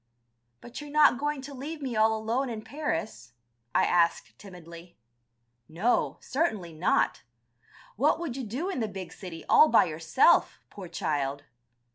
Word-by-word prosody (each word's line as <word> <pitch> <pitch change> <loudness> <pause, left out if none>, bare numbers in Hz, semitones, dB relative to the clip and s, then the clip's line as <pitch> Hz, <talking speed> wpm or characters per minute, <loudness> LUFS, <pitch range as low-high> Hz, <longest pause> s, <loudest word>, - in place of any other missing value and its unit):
"But 240 +4 -9
you're 295 - -9
not 295 -3 +4
going 295 -1 -2
to 280 +1 -8
leave 295 +4 -6
me 260 -5 -4
all 220 +1 +3
alone 235 +5 -1
in 220 -2 -6
Paris?" 220 - -4 0.4
I - - +4
asked 170 -10 +1
timidly. 170 -2 -13 0.7
"No, 190 +10 0
certainly 215 - -2
not. 160 +4 +1 0.8
What 295 +7 +2
would 325 -8 -4
you 265 - -4
do 250 - -4
in 385 -8 -3
the 220 - -1
big 190 -4 -8
city, 175 -5 -9
all 310 - +6
by 230 - +5
yourself, 160 - +2
poor 195 -3 -9
child. 140 -3 -2
220 Hz, 150 wpm, -28 LUFS, 170-275 Hz, 0.8 s, all